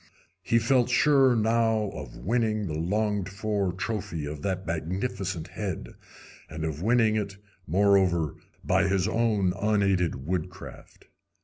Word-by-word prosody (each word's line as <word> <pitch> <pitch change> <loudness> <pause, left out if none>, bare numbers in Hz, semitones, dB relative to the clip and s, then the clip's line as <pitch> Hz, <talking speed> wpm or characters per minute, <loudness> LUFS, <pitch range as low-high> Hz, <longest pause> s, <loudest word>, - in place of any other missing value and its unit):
He 115 +5 +2
felt 120 +1 +3
sure 135 0 +4
now 110 -2 +1
of - - -8
winning 110 -1 0
the 80 - -4
longed 100 +4 -1
for 100 -1 -1
trophy 95 -4 -4
of 75 0 -6
that 95 +1 -2
magnificent 90 +1 -3
head, 95 -1 -5 0.6
and 80 0 -6
of 80 -1 -4
winning 110 +1 +3
it, 100 -2 -3 0.3
moreover, 95 -4 +3 0.3
by 100 - +2
his 95 0 +1
own 110 -5 +1
unaided 95 -8 +1
woodcraft. 90 +2 -6
100 Hz, 125 wpm, -27 LUFS, 90-110 Hz, 0.6 s, sure